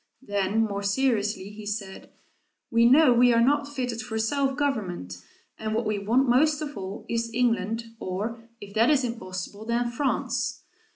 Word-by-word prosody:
Then 205 -1 0
more 200 -2 -2
seriously, 205 -2 0
he 210 0 -9
said, 205 -2 -5 0.6
"We 230 0 +5
know 280 -1 +6
we 245 +1 +5
are 230 - +4
not 280 +4 +3
fitted 250 -5 -3
for 220 0 -5
self 270 +4 0
government, 180 - -2 0.4
and 220 0 -2
what 230 +1 0
we 215 -1 0
want 235 +7 +2
most 290 +5 +3
of 295 -2 -5
all 195 +1 -6
is 230 0 -2
England, 230 -2 +1 0.2
or 225 +5 -4
if 205 -2 -10
that 225 +3 +4
is 285 -3 +3
impossible, 205 -4 -5
then 235 +1 0
France." 270 +3 -1
230 Hz, 165 wpm, -26 LUFS, 205-250 Hz, 0.6 s, know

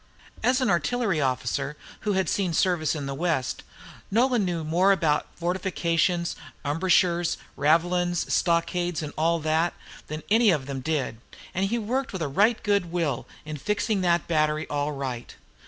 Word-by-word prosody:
[Note - - -24
9] - - +5
As 260 +1 +2
an 255 - +2
artillery 180 +1 +1
officer, 135 +2 -1 0.2
who 210 - -1
had 190 -2 +1
seen 185 -1 0
service 170 -2 +2
in 145 -2 -4
the 140 - -3
West, 160 -3 -1 0.5
Nolan 240 +1 +3
knew 175 -3 -1
more 175 +5 +3
about 165 -6 +2
fortifications, 175 -1 0 0.3
embrasures, 175 +2 +2 0.2
ravelins, 175 +4 +2
stockades, 175 0 +1
and 150 - -6
all 165 +2 +2
that, 160 +2 +1 0.3
than 155 +1 -5
any 225 0 +5
of 150 -7 +2
them 135 -1 -4
did; 135 -4 -2 0.4
and 190 +2 +1
he 235 +4 0
worked 250 +4 -2
with 185 -3 -2
a - - -1
right 205 - +2
good 200 -5 +1
will 165 -8 -1 0.2
in 155 0 -5
fixing 210 +5 0
that 175 -2 +2
battery 155 -1 +1
all 145 0 0
right. 130 -4 -5
170 Hz, 165 wpm, -26 LUFS, 150-190 Hz, 0.5 s, 9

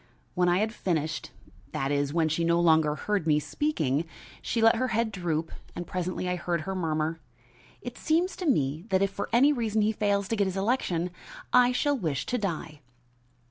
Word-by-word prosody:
When 180 -1 +2
I 175 - +3
had 215 +2 0
finished 165 -6 -2 0.4
that 135 +1 -1
is, 145 -1 0
when 165 0 +2
she 160 +2 0
no 170 +1 +3
longer 160 -3 +4
heard 195 +1 -1
me 150 -1 +4
speaking 155 - -1 0.4
she 230 - -2
let 225 +1 +5
her 255 - 0
head 230 -1 0
droop 165 -4 -2 0.2
and 175 - -4
presently 185 +1 -3
I 180 0 -1
heard 170 -1 -1
her 190 +5 -4
murmur: 160 -2 -1 0.6
"It 245 -1 -7
seems 335 +4 +1
to 360 - -3
me 150 - +1
that 190 0 +3
if 195 - 0
for 200 - -4
any 275 +5 +5
reason 220 -4 0
he 215 - +2
fails 200 -2 0
to 225 - +1
get 200 -2 +1
his 190 0 -3
election 190 -5 0 0.4
I 250 0 +6
shall 290 +3 +1
wish 160 - -2
to 250 - -1
die." 165 -6 -4
180 Hz, 195 wpm, -28 LUFS, 160-225 Hz, 0.6 s, I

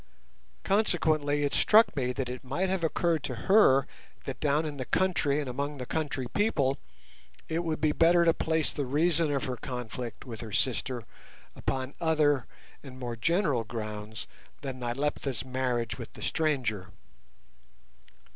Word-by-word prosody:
Consequently 155 -8 +2
it 145 - 0
struck 215 -4 +5
me 125 -3 0
that 125 0 -3
it 125 +2 -6
might 140 +9 -1
have 190 -2 -1
occurred 165 0 +1
to 130 -3 -4
her 140 -10 +6 0.4
that 135 - -5
down 150 +1 +1
in 150 -2 -5
the 130 - -4
country 160 -6 +1
and 145 - -3
among 140 +3 -3
the 125 - -5
country 145 -3 -2
people, 145 -11 +1 0.7
it 165 +2 -1
would 160 -2 -2
be 155 -1 +2
better 170 +2 +4
to 165 - +5
place 160 -1 +1
the 140 -3 -2
reason 160 +3 +2
of 140 -2 0
her 125 -1 -3
conflict 125 -1 -6
with 115 -4 -6
her 110 -2 -7
sister 125 +2 0 0.5
upon 130 +1 -3
other 150 -5 +2 0.3
and 130 -2 -11
more 120 -2 -4
general 150 - +1
grounds 110 -1 -6 0.4
than 135 -2 -5
Nyleptha's 130 0 -2
marriage 125 -2 -1
with 115 - -8
the - - -9
stranger. 125 - 0
140 Hz, 155 wpm, -29 LUFS, 125-160 Hz, 0.7 s, her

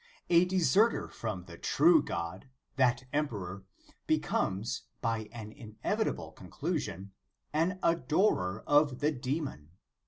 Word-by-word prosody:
A 170 +1 +6
deserter 190 - +3
from 105 -6 -4
the 85 -1 -12
true 160 +1 +5
God, 85 +8 -5 0.3
that 130 0 +3
emperor, 100 -10 -2 0.4
becomes, 100 +5 0 0.2
by 115 -2 -2
an 110 -3 -8
inevitable 110 -4 -3
conclusion, 100 +1 -4 0.4
an 165 +5 +1
adorer 140 - +2
of 145 -3 +4
the 150 +2 +1
demon. 135 - -4
125 Hz, 105 wpm, -31 LUFS, 100-155 Hz, 0.4 s, A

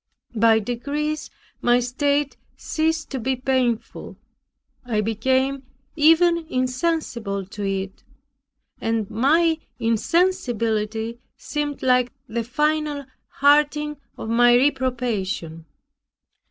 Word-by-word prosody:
By 225 0 +4
degrees 285 +7 -3 0.3
my 240 0 +4
state 280 +3 0 0.2
ceased 320 0 -1
to 265 - -3
be 260 +3 0
painful. 255 -3 -2 0.7
I 235 -4 -1
became 260 +5 0 0.3
even 330 +2 +5
insensible 255 - -1
to 205 +2 -7
it, 195 0 -4 0.8
and 225 -2 -1
my 315 +8 +3 0.2
insensibility 230 - 0 0.2
seemed 295 -1 -4
like 250 -1 +3 0.2
the 230 0 -2
final 300 +3 -1 0.2
hardening 295 +1 +2 0.2
of - - -6
my 240 +1 +5
reprobation. 235 - -1
255 Hz, 90 wpm, -23 LUFS, 225-295 Hz, 0.8 s, even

